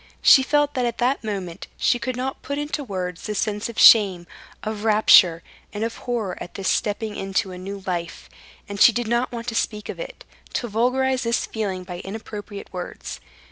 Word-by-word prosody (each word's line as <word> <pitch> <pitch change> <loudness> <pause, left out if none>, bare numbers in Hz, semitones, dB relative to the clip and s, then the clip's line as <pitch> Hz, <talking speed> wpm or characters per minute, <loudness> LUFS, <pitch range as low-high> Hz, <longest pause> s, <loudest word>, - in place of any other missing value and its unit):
She 270 - +8
felt 290 +2 +1
that 250 -3 0
at 235 - -4
that 250 +2 0
moment 195 -6 -5
she 245 - +2
could 255 +1 -3
not 260 +2 -4
put 280 - -4
into 295 0 -3
words 185 -6 -4
the 210 - -3
sense 210 +2 -1
of 235 - -9
shame, 195 -6 +7 0.4
of 215 -1 -4
rapture, 200 -6 +6 0.3
and 210 +1 -3
of 230 0 -3
horror 225 -7 -3
at - - -8
this 195 - -1
stepping 210 0 -1
into 195 0 -2
a 180 - -8
new 195 +1 -7
life, 170 -2 -4 0.4
and 200 -1 -5
she - - +9
did 240 0 -2
not 235 +2 0
want 235 -1 -6
to - - -6
speak 210 -2 -2
of - - -6
it, - - -8 0.3
to 240 - -2
vulgarize 255 +4 +1
this 235 0 0
feeling 195 -4 -3
by 180 -1 -7
inappropriate 205 0 -8
words. 180 -1 -6
215 Hz, 195 wpm, -23 LUFS, 195-245 Hz, 0.4 s, she